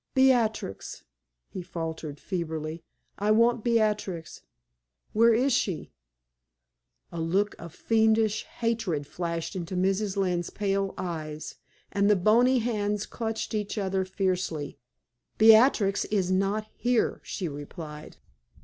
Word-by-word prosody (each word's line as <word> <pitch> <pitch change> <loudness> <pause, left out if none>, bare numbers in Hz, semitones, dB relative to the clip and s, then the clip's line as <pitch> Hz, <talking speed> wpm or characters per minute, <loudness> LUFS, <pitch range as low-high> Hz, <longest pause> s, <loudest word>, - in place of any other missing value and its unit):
"Beatrix!" 240 - +1 0.4
he 185 - -7
faltered, 160 -4 -5
feebly. 160 -3 -4 0.4
"I 205 +1 0
want 230 +1 +4
Beatrix. 210 -8 0 0.7
Where 230 +2 +5
is 250 +4 +3
she?" 190 -8 -1 1.2
A 170 - -4
look 195 +6 +1
of 170 -1 -9
fiendish 220 -1 +2
hatred 225 -11 -2
flashed 170 +3 -4
into 185 0 -4
Mrs. 195 +2 0
Lynne's 180 -3 0
pale 195 -1 -1
eyes, 155 -4 -5 0.3
and 200 0 +2
the 210 - +6
bony 235 +7 +4
hands 210 -3 -1
clutched 225 -1 -4
each 210 0 -2
other 190 -2 0
fiercely. 185 -5 -2 0.6
"Beatrix 220 -2 +5
is 190 -3 0
not 195 +3 +1
here," 245 -2 0
she 185 - -4
replied. 150 +1 -8
195 Hz, 115 wpm, -27 LUFS, 170-220 Hz, 1.2 s, the